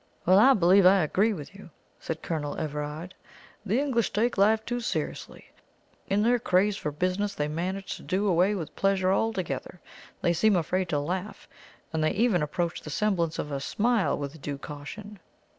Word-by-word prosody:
"Well, 185 +3 +6
I 265 +5 +7
believe 190 +1 +5
I 185 0 +6
agree 200 +8 +2
with 160 -4 -7
you," 200 -3 -13 0.3
said 160 -1 -5
Colonel 150 -3 -3
Everard. 150 +4 -5 0.5
"The 215 +4 +1
English 255 -5 0
take 230 +4 +1
life 215 +2 +3
too 245 0 -2
seriously. 235 - -5 0.6
In 200 +2 +1
their 240 +2 +3
craze 200 -1 +2
for 150 - -4
business 185 +6 -1
they 150 - -1
manage 185 +5 -4
to - - -13
do 195 +2 -1
away 185 +3 +3
with 165 -6 -6
pleasure 195 -1 +2
altogether. 185 -7 -2 0.4
They 175 - +2
seem 210 +4 +3
afraid 180 +1 0
to 150 - +1
laugh, 180 +8 -4 0.5
and 160 -1 0
they 155 - +2
even 210 -5 +2
approach 170 +3 -2
the - - -9
semblance 170 -1 0
of 150 - -4
a 140 - -2
smile 220 - +1
with 145 +1 -6
due 145 0 -4
caution." 180 +9 -9
185 Hz, 175 wpm, -27 LUFS, 155-210 Hz, 0.6 s, I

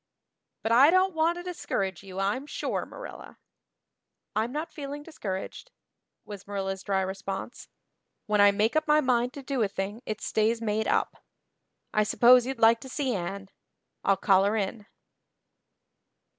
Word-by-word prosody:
But 225 - -1
I 260 +6 +7
don't 370 +2 +3
want 325 +2 +1
to 350 - -6
discourage 195 - -3
you 190 -1 -8
I'm 210 +9 -1
sure, - - -3
Marilla." - - -10 1.0
"I'm 220 +3 0
not 305 +4 -4
feeling 290 0 -7
discouraged," 200 - -6 0.6
was 200 -2 -9
Marilla's 195 -1 -3
dry 195 -1 0
response, 195 +4 -5 0.6
"when 210 -2 +2
I 205 - +8
make 210 +6 +1
up 310 0 +1
my 300 0 +5
mind 250 -3 +1
to 280 - -9
do 265 -2 -2
a 210 - +3
thing 200 +3 -5
it 215 - -3
stays 220 +2 +1
made 220 -1 -1
up. - - 0 0.7
I 215 - +3
suppose 240 +3 +5
you'd 265 -1 -3
like 230 0 +5
to 265 - -10
see 265 -1 -1
Anne. 195 +1 -4 0.5
I'll 195 -1 +3
call 195 0 +4
her 205 +2 +1
in." 205 +1 -3
220 Hz, 155 wpm, -27 LUFS, 195-270 Hz, 1.0 s, I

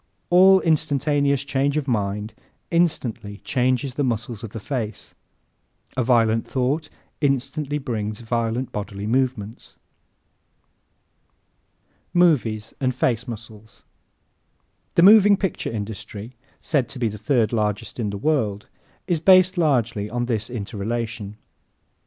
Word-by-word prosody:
An 190 +2 +7
instantaneous 145 -3 +1
change 140 +1 0
of 150 -2 -2
mind 105 -2 -2 0.4
instantly 125 -12 0
changes 130 +1 0
the 145 - -1
muscles 120 -2 -3
of 115 - -5
the 115 - -7
face. 110 -1 -5 0.8
A 130 - +1
violent 115 -2 +2
thought 140 +4 -1 0.3
instantly 145 +1 0
brings 110 -6 -4
violent 115 +2 -2
bodily 100 -1 -5
movements. 120 -2 -2 2.4
Movies 120 -12 +2
and 130 -2 0
Face 125 -1 0
Muscles 110 -2 -10 1.1
¶ - - -45
The 170 - +5
moving 205 0 +8
picture 190 - -2
industry 105 +1 -6 0.3
said 135 -6 0
to - - -7
be 120 -2 0
the 105 -1 -6
third 120 -3 +1
largest 105 0 -2
in 110 -3 -1
the 100 - -4
world 105 -6 -1 0.4
is 175 -4 0
based 185 +2 +6
largely 120 - +1
on 120 +1 -2
this 115 -2 -2
interrelation. 110 -1 -4
120 Hz, 120 wpm, -23 LUFS, 110-145 Hz, 2.4 s, moving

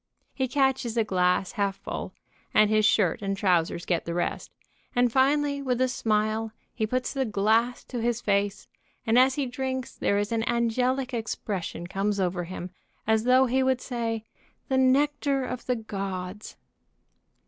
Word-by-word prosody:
He 265 -2 -1
catches 265 -3 +1
a 225 - +4
glass 180 -2 +1
half 200 -4 -1
full, - - -6 0.4
and 215 0 +5
his 215 -1 +4
shirt 195 -5 +2
and 195 -1 -2
trousers 175 -3 +1
get 175 - 0
the 170 - -3
rest, 175 - -2 0.5
and 245 -1 +3
finally 280 +2 +2
with 250 -3 -1
a 255 - +3
smile 220 -2 0 0.2
he 220 -2 -1
puts 255 +3 -1
the 270 -1 0
glass 225 +2 +1
to 245 -3 -5
his 235 0 0
face, 200 -2 0 0.4
and 230 +1 +4
as 260 +1 +4
he 285 - 0
drinks 260 0 -3
there 200 - +1
is 205 +1 -1
an 225 -1 +1
angelic 250 +3 0
expression 205 -6 -4
comes 195 +3 -1
over 180 -1 -1
him 180 0 -7 0.3
as 220 +1 +2
though 255 +1 +5
he 260 +1 +1
would 260 -1 +2
say, 230 -3 -3 0.5
"The 265 - +2
nectar 275 +1 +2
of 250 -1 -6
the 250 - +2
gods." 195 -2 -5
225 Hz, 165 wpm, -27 LUFS, 200-255 Hz, 0.5 s, and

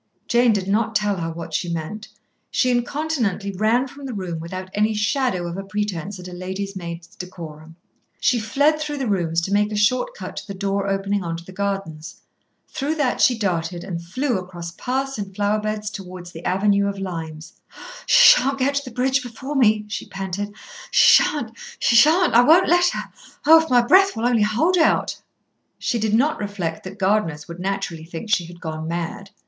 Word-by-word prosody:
Jane 240 0 +4
did 195 -3 -1
not 220 +2 0
tell 205 -1 +1
her 165 -1 -3
what 165 0 -7
she 170 +2 -1
meant. 170 +7 -5 0.4
She 255 - +2
incontinently 240 - -1
ran 220 +7 +1
from 275 +1 -10
the 250 - -5
room 180 -4 -4
without 185 +3 -7
any 215 +1 +1
shadow 210 -3 0
of 170 +1 -5
a 195 - -4
pretence 200 -2 -3
at 180 - -9
a 180 - -9
lady's 190 +2 -5
maid's 170 -2 -6
decorum. 165 -3 -10 0.4
She 245 - +2
fled 285 +8 +2
through 300 -1 -3
the 270 - -2
rooms, 170 -5 0
to 190 +4 -3
make 210 +1 +2
a - - -3
short 255 - +1
cut - - -8
to - - -6
the 200 - -6
door 195 0 -1
opening 195 0 -1
on 165 -1 -3
to 170 - -11
the 185 - -11
gardens. 195 -5 -4 0.5
Through 305 +1 -2
that 290 -5 0
she 245 - +4
darted, 175 -4 -2
and 175 -3 -5
flew 240 +6 -1
across 175 -2 -8
paths 265 +5 -3
and 195 -2 -6
flowerbeds 210 +1 -1
towards 185 -3 -9
the 165 0 -10
avenue 200 +1 +2
of 200 0 -3
limes. 165 -4 -7 0.5
"She - - +8
shan't 275 +2 -1
get 275 +1 +1
to 285 0 -1
the 250 -3 -10
bridge 265 +2 +2
before 255 +4 -7
me," 215 -5 +3
she 210 - -5
panted. 195 +1 -4 0.4
"She - - +7
shan't, 265 -7 -2 0.3
she 235 - +2
shan't. 320 +8 +5
I 235 - +7
won't 325 +9 +5
let 350 +1 +4
her. - - -3 0.4
Oh, 320 +2 +8
if 320 - -6
my 245 -1 +5
breath 380 +8 +5
will 225 +1 -2
only 240 -2 +3
hold 305 +13 +2
out!" 320 - +2 0.6
She 235 - -1
did 220 0 +1
not 285 +7 +2
reflect 190 -6 -4
that 190 +2 -8
gardeners 190 -6 0
would 170 0 -9
naturally 190 -4 -3
think 170 +6 -7
she 180 -5 +2
had 175 0 -12
gone 160 -2 -5
mad. 170 +4 -4
205 Hz, 195 wpm, -22 LUFS, 180-245 Hz, 0.6 s, She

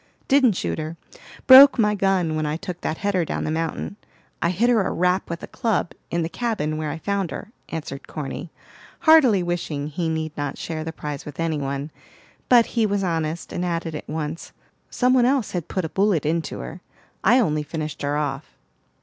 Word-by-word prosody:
"Didn't 265 -5 +5
shoot 175 - -3
her; 155 +2 -5 0.5
broke 270 +1 +10
my 210 -3 +3
gun 190 -5 +1
when 155 - -1
I 150 +1 -1
took 180 -1 -7
that 160 - -2
header 200 -3 0
down - - -3
the 155 - -2
mountain. 165 +5 -3 0.4
I 170 - +2
hit 195 +7 +1
her 240 -3 +4
a 190 - -1
rap 180 +2 +1
with 170 0 -5
a - - -5
club, 225 -8 -1 0.2
in 170 -1 0
the - - -1
cabin 170 -7 -2
where 155 -1 -2
I 155 - -4
found 195 +1 -2
her," 215 - -7 0.2
answered 145 -4 -6
Corny, 150 +3 -6 0.5
heartily 265 - +6
wishing 165 -4 -3
he 165 +2 -2
need 160 -1 -3
not 145 -2 -3
share 160 -1 -4
the 160 - -4
prize 150 -3 -6
with 150 0 -10
any 165 -2 0
one. 140 +2 -3 0.6
But 240 -2 +7
he 230 -3 +2
was 200 -1 0
honest, 165 -2 -2
and 175 - -2
added 165 -2 -2
at 150 - -7
once, 155 +1 -5 0.4
"Some 250 0 +2
one 250 -2 +5
else 260 -3 +1
had 175 -4 -3
put 185 -3 -2
a - - -4
bullet 195 -5 +1
into 160 +2 -1
her; 170 +3 -8 0.4
I 235 +5 +5
only 155 -11 +2
finished 155 0 -5
her 145 +1 0
off." 145 -1 -4
170 Hz, 200 wpm, -23 LUFS, 155-200 Hz, 0.6 s, broke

